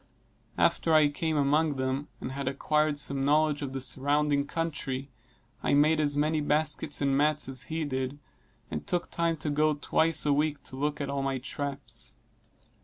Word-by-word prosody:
After 165 Hz, -1 st, +3 dB
I 150 Hz, -2 st, +6 dB
came 160 Hz, +1 st, -1 dB
among 145 Hz, +2 st, +2 dB
them 130 Hz, +2 st, -2 dB
and 130 Hz, -, -5 dB
had 140 Hz, 0 st, -4 dB
acquired 150 Hz, +2 st, +1 dB
some 140 Hz, -1 st, -1 dB
knowledge 150 Hz, +1 st, +2 dB
of 140 Hz, -2 st, -4 dB
the 135 Hz, -, -4 dB
surrounding 140 Hz, +2 st, +1 dB
country, 140 Hz, -5 st, -3 dB, 0.5 s
I -, -, +2 dB
made 155 Hz, +2 st, +4 dB
as 145 Hz, -1 st, +1 dB
many 155 Hz, +1 st, +1 dB
baskets 150 Hz, -1 st, 0 dB
and 140 Hz, -1 st, +2 dB
mats 150 Hz, 0 st, +2 dB
as 130 Hz, -2 st, -3 dB
he 160 Hz, 0 st, -2 dB
did, 130 Hz, 0 st, -3 dB, 0.5 s
and -, -, -5 dB
took 175 Hz, -1 st, -1 dB
time 170 Hz, -1 st, 0 dB
to 150 Hz, 0 st, -2 dB
go 150 Hz, +1 st, +2 dB
twice 160 Hz, +2 st, +1 dB
a 145 Hz, -, +3 dB
week 150 Hz, -1 st, 0 dB
to -, -, -7 dB
look 145 Hz, +2 st, -2 dB
at 140 Hz, -, -3 dB
all 140 Hz, -1 st, -1 dB
my 135 Hz, -1 st, -1 dB
traps. 135 Hz, -, -6 dB
145 Hz, 180 wpm, -28 LUFS, 135-155 Hz, 0.5 s, I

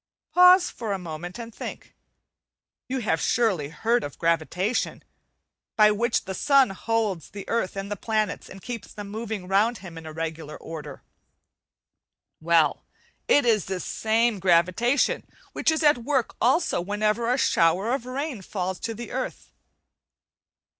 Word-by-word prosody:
Pause 360 Hz, 0 st, +7 dB
for 220 Hz, -4 st, -4 dB
a -, -, -1 dB
moment 175 Hz, +1 st, -7 dB
and 230 Hz, -1 st, -8 dB
think. -, -, -8 dB, 1.0 s
You 260 Hz, 0 st, -1 dB
have 165 Hz, -8 st, 0 dB
surely 195 Hz, -12 st, +1 dB
heard 230 Hz, +8 st, 0 dB
of 145 Hz, -, -7 dB
gravitation, 170 Hz, +6 st, 0 dB, 0.7 s
by 210 Hz, -1 st, +6 dB
which 230 Hz, +3 st, 0 dB
the 190 Hz, -, -4 dB
sun 275 Hz, +1 st, +4 dB
holds 210 Hz, -3 st, -2 dB
the 200 Hz, 0 st, -9 dB
earth 230 Hz, -5 st, -1 dB
and 195 Hz, +1 st, -5 dB
the -, -, -1 dB
planets, 215 Hz, +1 st, -2 dB
and 190 Hz, 0 st, -12 dB
keeps 240 Hz, -3 st, -6 dB
them 205 Hz, -1 st, -8 dB
moving 215 Hz, -3 st, -5 dB
round 210 Hz, +5 st, +2 dB
him 175 Hz, -4 st, -9 dB
in 160 Hz, -1 st, -9 dB
regular 160 Hz, -1 st, -5 dB
order? 160 Hz, -2 st, -9 dB, 1.4 s
Well, 160 Hz, -2 st, +2 dB, 0.4 s
it 285 Hz, -, +4 dB
is 220 Hz, -4 st, +3 dB
this 190 Hz, -1 st, -4 dB
same 225 Hz, -1 st, +1 dB
gravitation 185 Hz, -, +2 dB, 0.3 s
which -, -, +1 dB
is 315 Hz, 0 st, +1 dB
a 295 Hz, -1 st, +7 dB
t 245 Hz, -, -10 dB
work 265 Hz, -1 st, 0 dB
also 260 Hz, -, +2 dB
whenever 210 Hz, +5 st, 0 dB
a 250 Hz, -, +2 dB
shower 190 Hz, 0 st, +2 dB
of 250 Hz, -2 st, -3 dB
rain 265 Hz, -3 st, -4 dB
falls 185 Hz, -1 st, -4 dB
to 225 Hz, -, -4 dB
the 235 Hz, +2 st, -8 dB
earth. -, -, -5 dB
210 Hz, 150 wpm, -25 LUFS, 180-235 Hz, 1.4 s, Pause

